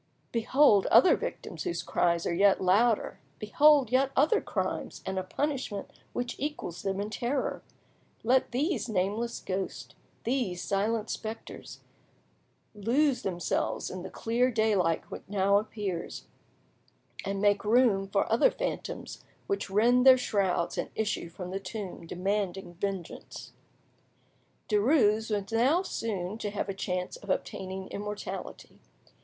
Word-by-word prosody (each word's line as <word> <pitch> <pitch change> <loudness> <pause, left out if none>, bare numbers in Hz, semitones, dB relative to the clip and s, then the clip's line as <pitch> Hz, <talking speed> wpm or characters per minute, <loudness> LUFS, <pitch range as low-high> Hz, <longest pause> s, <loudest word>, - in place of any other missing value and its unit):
Behold 230 -2 +4
other 370 - +7
victims - - -6
whose 355 -2 -2
cries 170 -1 +1
are - - 0
yet 195 +3 +4
louder, 205 +5 +2 0.2
behold 280 +3 +4
yet 265 +1 +3
other 310 - +4
crimes - - -3
and 190 0 -2
a - - -3
punishment 255 -2 -3 0.2
which 245 0 -3
equals 290 - -4
them 195 0 -2
in 205 +1 -3
terror! 250 +5 -2 0.6
Let 255 +3 +3
these 260 - -1
nameless 215 +4 -1
ghosts, 190 0 -4 0.3
these 235 -8 -1
silent 215 +2 0
spectres, 220 0 -7 0.9
lose 250 +7 +1
themselves 175 -3 -2
in 185 - -6
the - - -7
clear 240 +3 +1
daylight 210 -8 +2
which - - -6
now 200 0 +3
appears, 205 -5 -5 1.0
and 195 0 -2
make 205 0 +3
room 215 -3 +3
for 195 0 +1
other 230 - +5
phantoms - - -5 0.2
which 400 - -2
rend 235 +5 +4
their 260 -1 +9
shrouds 195 -8 0
and - - -2
issue 210 -5 -2
from 180 +1 -7
the 195 - -2
tomb 190 -3 -7
demanding 190 0 -2
vengeance. 190 -1 -6 1.1
Derues 220 -1 +3
was 205 -1 -2
now 265 +11 +3
soon 210 - -3
to 210 - -2
have 200 0 -3
a - - -1
chance 180 -1 -3
of 205 - -13
obtaining 190 0 -3
immortality. 210 0 -6
210 Hz, 130 wpm, -29 LUFS, 190-245 Hz, 1.1 s, their